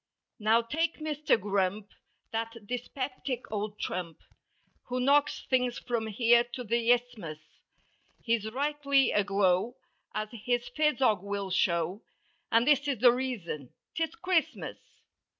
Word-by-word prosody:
Now 225 +2 +4
take 320 +8 -1
Mister 305 -3 +1
Grump, 200 0 -1 0.4
that 225 -1 -4
dyspeptic 255 +2 -4
old 210 0 -3
trump. 175 -5 -4 0.7
Who 250 0 -2
knocks 280 +3 +3
things 250 -2 +1
from 235 -3 -2
here 235 +2 +4
to 250 - -4
the 235 +1 +2
Isthmus, 235 -10 -1 0.9
He's 225 -2 0
rightly 280 +1 +2
aglow 200 +3 +2 0.4
as 215 0 -2
his 245 +1 -1
phisog 275 -10 +3
will 200 -1 -4
show. 175 +2 +1 0.5
And 230 +1 +4
this 290 -1 +4
is 275 -3 0
the 245 +2 +7
reason: 225 - -4 0.2
'Tis 325 +5 -2
Christmas. 360 -6 -1
235 Hz, 120 wpm, -29 LUFS, 205-265 Hz, 0.9 s, the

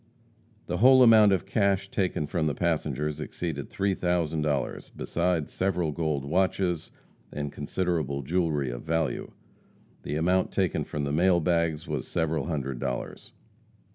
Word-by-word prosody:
The 90 - -2
whole 130 +4 +7
amount 110 -3 +7
of 95 -1 +1
cash 100 -1 +1
taken 90 -6 0
from 80 +1 -1
the 75 - -1
passengers 75 -3 -1
exceeded 80 -5 -4
three 100 0 0
thousand 85 -4 0
dollars, 75 -2 -2
besides 85 -3 -1
several 90 -4 0
gold 75 -3 -2
watches, 90 +1 0 0.4
and 75 -1 -4
considerable 75 -3 -2
jewelry 75 -4 0
of - - -6
value. 80 -1 -1 0.7
The 75 - -4
amount 90 +4 +1
taken 95 -5 0
from 75 - -4
the 70 0 -2
mail 90 +3 +4
bags 85 -2 0
was - - -3
several 80 -1 -1
hundred 70 -6 -3
dollars. 60 - -5
85 Hz, 140 wpm, -27 LUFS, 75-95 Hz, 0.7 s, whole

